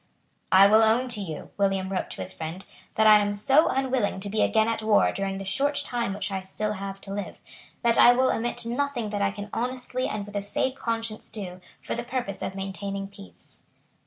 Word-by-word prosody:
"I 190 +1 +8
will 215 +2 +6
own 230 +4 +3
to 235 -4 -1
you," 160 -6 -7
William 195 -1 +1
wrote 190 - -2
to - - -5
his 190 - -7
friend, 165 +4 -6 0.3
"that 220 - +3
I 215 -1 +8
am 205 0 0
so 275 +9 +4
unwilling 260 -7 0
to 200 - -4
be 215 - +1
again 220 0 +3
at 230 -1 -1
war 215 -1 +4
during 195 0 -3
the 195 - -6
short 285 +9 0
time 235 -5 -2
which 200 -1 -3
I 190 -1 -2
still 210 +3 -3
have 195 -1 -6
to 195 - -7
live, 205 0 -5 0.4
that 235 -1 +3
I 240 - +9
will 260 +1 +3
omit 240 +1 -1
nothing 240 -2 -2
that 205 -1 -2
I 200 - +3
can 205 +1 -8
honestly 255 +1 -2
and 210 -1 -4
with 205 0 -11
a 205 - 0
safe 210 +6 -1
conscience 230 -4 -4
do 185 -4 -7 0.2
for - - -5
the 235 - -3
purpose 240 -5 -4
of 190 - -4
maintaining 195 0 -4
peace." 90 - -15
210 Hz, 220 wpm, -26 LUFS, 195-240 Hz, 0.4 s, I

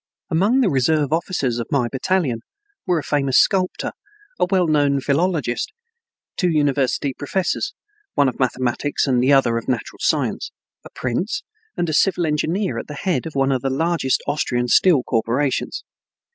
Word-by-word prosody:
Among 205 +11 +3
the - - +3
reserve 145 +2 +2
officers 150 -8 -1
of 115 - -4
my 130 -4 +2
battalion 135 -1 0 0.5
were 180 -2 +2
a 155 - -2
famous 140 -3 +1
sculptor, 185 -2 +2 0.5
a - - +4
well 185 -2 +3
known 145 -3 +2
philologist, 145 - 0 0.7
two 180 - +2
university 140 -3 +1
professors 175 +7 -2 0.4
(one 140 - +4
of 125 - -3
mathematics, 130 +2 0
the 130 0 +2
other 125 -4 +4
of 115 - -13
natural 125 -4 -3
science), - - 0 0.3
a - - -11
prince, 175 - -3 0.3
and 175 - 0
a 155 - -2
civil 180 +1 +2
engineer 165 +6 -1
at - - -8
the 150 - -7
head 165 -3 -1
of 160 - -9
one 135 0 +2
of 130 -2 0
the 135 - -1
largest 160 -1 0
Austrian 125 -4 -1
steel 150 0 +4
corporations. 125 +4 -1
145 Hz, 160 wpm, -21 LUFS, 130-170 Hz, 0.7 s, a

